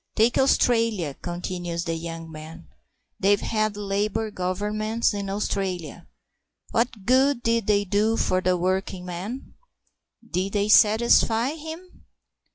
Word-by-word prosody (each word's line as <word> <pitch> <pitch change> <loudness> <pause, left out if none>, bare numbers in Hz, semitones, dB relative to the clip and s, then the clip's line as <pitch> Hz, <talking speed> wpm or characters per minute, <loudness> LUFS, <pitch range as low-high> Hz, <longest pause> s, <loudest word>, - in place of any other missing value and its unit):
"Take 230 +2 +3
Australia," 230 - +2
continues 175 +1 -4
the 165 - -2
young 165 0 -6
man; 160 +2 -10 0.5
"they've 200 +1 +3
had 215 -2 -1
Labour 210 +2 -1
Governments 210 +5 -1
in 200 -1 -4
Australia. 185 -5 -3 0.6
What 230 -4 -1
good 260 +1 +3
did 230 -2 +1
they 205 -1 +3
do 210 +3 +1
for 185 0 +1
the 185 0 +1
working 185 +1 -2
man? 190 +9 -6 0.7
Did 185 +1 -2
they 205 0 0
satisfy 225 +3 +4
him? 320 +4 -10
205 Hz, 120 wpm, -24 LUFS, 180-225 Hz, 0.7 s, satisfy